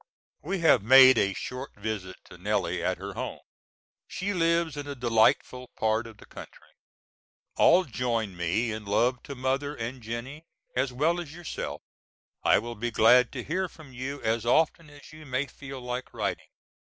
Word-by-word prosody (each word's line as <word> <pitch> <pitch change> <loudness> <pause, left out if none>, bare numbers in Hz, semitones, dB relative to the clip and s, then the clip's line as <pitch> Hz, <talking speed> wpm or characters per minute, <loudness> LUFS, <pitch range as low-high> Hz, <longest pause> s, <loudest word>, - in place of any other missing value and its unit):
We 190 +3 -3
have 150 -8 +5
made 130 +2 +8
a 100 -1 +1
short 125 +7 -6
visit 100 -3 -5
to - - -14
Nellie - - -1
at - - 0
her - - -7
home. - - -5 0.7
She 200 +2 -3
lives 170 -3 +1
in 145 -1 -6
a 140 - -5
delightful 120 +1 +2
part 110 +1 0
of 110 -2 -13
the - - -15
country. - - -13 0.8
All 180 +2 +5
join 115 - -2
me 90 +7 0
in 110 0 -5
love 120 +5 +1
to 140 - -8
Mother 135 +3 -1
and 120 +1 -5
Jennie 120 +7 -6 0.3
as 130 +1 0
well 155 +7 +1
as 160 -2 -10
yourself. 175 -2 -6 0.6
I - - +4
will 120 0 -4
be 120 +2 -3
glad 120 +2 +5
to 125 -3 -5
hear 185 +3 -2
from 150 -6 -15
you 135 +3 -5
as 110 0 0
often 155 +5 +2
as 145 +1 -15
you 155 -1 -12
may 130 +2 -1
feel 135 -1 -9
like 125 0 -6
writing. - - -3
125 Hz, 175 wpm, -27 LUFS, 115-145 Hz, 0.8 s, made